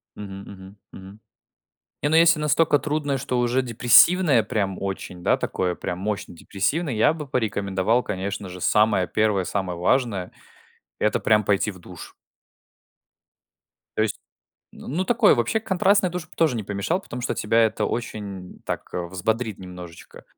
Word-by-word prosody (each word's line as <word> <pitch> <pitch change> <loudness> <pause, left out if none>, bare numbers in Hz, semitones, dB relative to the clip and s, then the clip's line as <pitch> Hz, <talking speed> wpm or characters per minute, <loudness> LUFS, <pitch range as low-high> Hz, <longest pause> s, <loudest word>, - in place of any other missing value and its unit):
Мгм. 100 -1 -8
Мгм. 95 +1 -13
Мгм. 95 +2 -12 0.8
Не, 145 - +2
ну, 160 - +4
если 165 -1 +6
настолько 150 0 +3
трудное, 145 0 -1
что 125 -1 -2
уже 120 +2 +1
депрессивное 125 +4 +5
прям 100 -3 -2
очень, 95 -2 -5
да, - - +3
такое 90 -1 -2
прям 90 - -5
мощно 100 -2 -4
депрессивное, 135 - -2
я 110 +7 +4
бы 155 -2 -7
порекомендовал, 105 -2 0
конечно 100 -1 -4
же, 90 0 -9
самое 105 -3 +2
первое, 105 -3 +1
самое 90 -3 -3
важное- 100 -2 0 0.7
это 105 - +1
прям 105 -1 +3
пойти 100 +1 +1
в 95 - -14
душ. 90 -1 -11 1.8
То - - +1
есть, 110 - 0 0.6
ну, - - -12
ну, 180 +8 -1
такое - - +4
вообще, 120 - 0
контрастный 195 -1 +2
душ 180 -2 -6
тоже 155 -7 +2
не 110 - -3
помешал, 105 - -2
потому 125 -8 -7
что - - -1
тебя 115 +2 +1
это 110 - -1
очень, 100 -6 -5
м, - - -23
так - - -4
взбодрит 95 +5 -2
немножечко. 90 -2 -11
110 Hz, 155 wpm, -23 LUFS, 95-135 Hz, 1.8 s, если